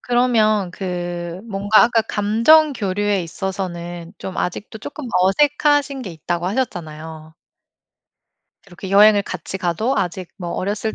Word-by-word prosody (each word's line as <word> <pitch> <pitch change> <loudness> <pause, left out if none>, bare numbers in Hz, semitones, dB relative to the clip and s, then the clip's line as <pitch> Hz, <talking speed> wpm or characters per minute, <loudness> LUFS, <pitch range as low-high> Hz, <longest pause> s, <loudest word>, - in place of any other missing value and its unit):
그러면 220 -6 +2
그 175 -1 -5
뭔가 205 +3 +4
아까 230 -1 +2
감정 230 +9 +4
교류에 205 -3 -1
있어서는 175 -1 -5
좀 190 - -7
아직도 205 +5 -4
쪼끔 290 +6 -8
어색하신 285 +8 +2
게 195 - -6
있다고 170 +2 -3
하셨잖아요. 160 -8 -5 1.3
이렇게 185 +1 -9
여행을 205 +1 +6
같이 190 - -6
가도 190 +9 -1
아직 185 -2 -2
뭐 175 -3 -6
"어렸을 205 +4 -2
195 Hz, 285 characters per minute, -20 LUFS, 175-220 Hz, 1.3 s, 여행을